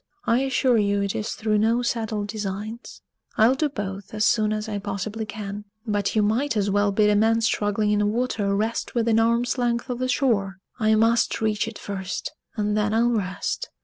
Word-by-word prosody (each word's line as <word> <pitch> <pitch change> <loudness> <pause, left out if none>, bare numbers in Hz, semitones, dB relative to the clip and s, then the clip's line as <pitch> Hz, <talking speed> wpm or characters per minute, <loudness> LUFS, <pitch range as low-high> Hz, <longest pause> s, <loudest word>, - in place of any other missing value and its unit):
"I 230 - +3
assure 260 -3 +2
you 200 -1 +1
it 200 - -1
is 215 - -2
through 215 -1 0
no 230 +3 +2
settled 220 -3 -2
designs. 210 +2 -6 0.3
I'll 225 +4 +5
do 295 +3 0
both 200 -5 -6
as 215 0 +2
soon 215 -1 +3
as 215 0 -2
I 205 -2 -3
possibly 205 +2 -4
can. 205 0 -6 0.2
But 205 -2 -1
you 215 - +3
might 225 +5 +1
as 200 -1 +1
well 205 0 +2
bid 210 +1 +3
a - - +3
man 225 +2 +3
struggling 210 -1 +1
in 210 - +2
the 210 - +2
water 215 -3 0
rest 220 +4 -2
within 230 -1 +3
arm's 235 +3 +1
length 240 +1 0
of 245 - -4
the 255 0 -1
shore! 205 -7 +1 0.2
I 220 -1 +3
must 225 +1 +2
reach 215 0 0
it 225 - -7
first, 190 -2 -5 0.2
and 210 -1 0
then 210 0 +1
I'll 235 +2 +3
rest. 190 -5 -2
215 Hz, 200 wpm, -24 LUFS, 205-230 Hz, 0.3 s, I'll